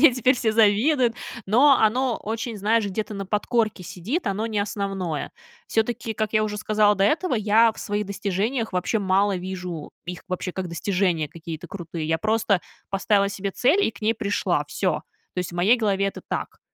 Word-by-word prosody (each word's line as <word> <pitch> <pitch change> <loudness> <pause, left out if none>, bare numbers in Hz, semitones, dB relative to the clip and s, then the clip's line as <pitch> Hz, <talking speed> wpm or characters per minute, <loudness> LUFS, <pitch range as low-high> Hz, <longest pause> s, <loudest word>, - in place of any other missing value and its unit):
мне 290 -6 +7
теперь 255 +1 +3
все 230 -2 +1
завидуют. 230 +4 +3 0.3
Но 265 +8 +6
оно 240 +3 +2
очень, 225 +1 -3
знаешь, 215 +2 +2
где-то 210 +2 -3
на 195 -1 -5
подкорке 215 0 0
сидит, 210 - -4
оно 210 +3 -1
не 215 -2 -2
основное. 195 -6 -2 0.4
Всё-таки, 225 0 -1
как 215 +1 -2
я 215 0 +3
уже 210 -1 -2
сказала 210 0 +3
до 195 - +2
этого, 315 - +2
я 220 +1 +4
в - - -16
своих 205 -1 -2
достижениях 205 +4 -2
вообще 185 +5 0
мало 195 0 +2
вижу 180 -4 -5 0.2
их 180 0 -6
вообще 185 0 -3
как 185 -1 -4
достижения 175 -2 0
какие-то 165 +1 -8
крутые. 170 -4 -5
Я 160 - +2
просто 215 0 +1 0.3
поставила 200 0 +2
себе 200 0 -3
цель 290 - +3
и - - +1
к 200 - -16
ней 220 +1 +2
пришла, 205 -2 0
всё. - - -1 0.3
То - - -4
есть 180 -1 -5
в - - -9
моей 190 +8 +4
голове 200 -4 +1
это 195 - -5
так. - - -4
205 Hz, 185 wpm, -24 LUFS, 190-225 Hz, 0.4 s, мне